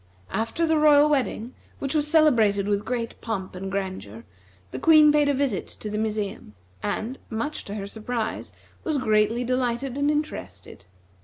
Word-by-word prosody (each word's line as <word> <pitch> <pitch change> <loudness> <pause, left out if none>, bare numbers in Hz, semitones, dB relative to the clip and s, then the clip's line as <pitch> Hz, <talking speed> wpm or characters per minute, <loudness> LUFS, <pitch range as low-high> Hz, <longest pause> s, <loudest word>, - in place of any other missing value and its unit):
After 230 +9 -1
the 320 -1 +2
royal 300 -1 +6
wedding, 260 -4 -1 0.2
which 275 -1 -3
was 300 -1 +1
celebrated 230 -11 +4
with 205 0 0
great 235 -1 -4
pomp 200 -5 -4
and 190 +1 -6
grandeur, 185 - -5 0.5
the - - -5
Queen 310 -2 +7
paid 295 -1 +3
a - - +3
visit 260 -8 -1
to 210 - -8
the 210 - -2
museum, 210 - -3 0.3
and, 245 +5 -3
much 230 +7 -3
to 205 - -6
her 200 -2 -4
surprise, 220 +2 -4 0.3
was 310 -3 0
greatly 220 -1 +2
delighted 255 +1 -1
and 285 +1 +2
interested. 300 - -4
235 Hz, 160 wpm, -25 LUFS, 210-290 Hz, 0.5 s, Queen